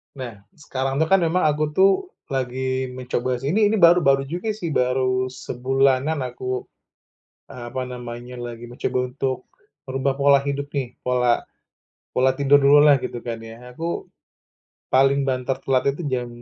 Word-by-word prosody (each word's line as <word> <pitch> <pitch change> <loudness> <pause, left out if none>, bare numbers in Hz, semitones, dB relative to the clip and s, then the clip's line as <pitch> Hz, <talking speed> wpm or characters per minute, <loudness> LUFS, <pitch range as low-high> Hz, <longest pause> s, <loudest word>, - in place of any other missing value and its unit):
Nah, 130 -3 -6 0.2
sekarang 135 -3 -3
itu 160 +3 +2
kan 195 - +6
memang 170 +1 +1
aku 150 0 +2
tuh, 195 +1 +6 0.3
lagi 130 0 -2
mencoba 125 0 -2
sih 140 +6 -2
ini 210 -1 +4
ini 220 - +1
baru-baru 170 -6 +5
juga 175 +9 -4
sih, 170 -7 -4
baru 130 0 +1
sebulanan 135 +3 0
aku, 125 +1 -4 0.9
eee, 120 -2 -8
apa 130 +1 -4
namanya 120 0 -8
lagi 120 -1 -7
mencoba 125 +1 -2
untuk, 130 -1 -3 0.4
merubah 135 +1 0
pola 140 0 +5
hidup 140 0 -3
nih. 135 -4 -3
Pola 125 -1 +2 0.7
pola 130 +1 +3
tidur 140 0 +5
dulu 140 +1 +7
lah 145 -2 +7
gitu 120 - -4
kan, 115 -1 -4
ya. 120 +2 -11
Aku, 165 +3 -4 0.9
paling 135 +2 +4
banter 130 -1 -1
telat 130 -1 +1
itu 175 - -7
jam 125 -1 -1
130 Hz, 155 wpm, -22 LUFS, 125-140 Hz, 0.9 s, dulu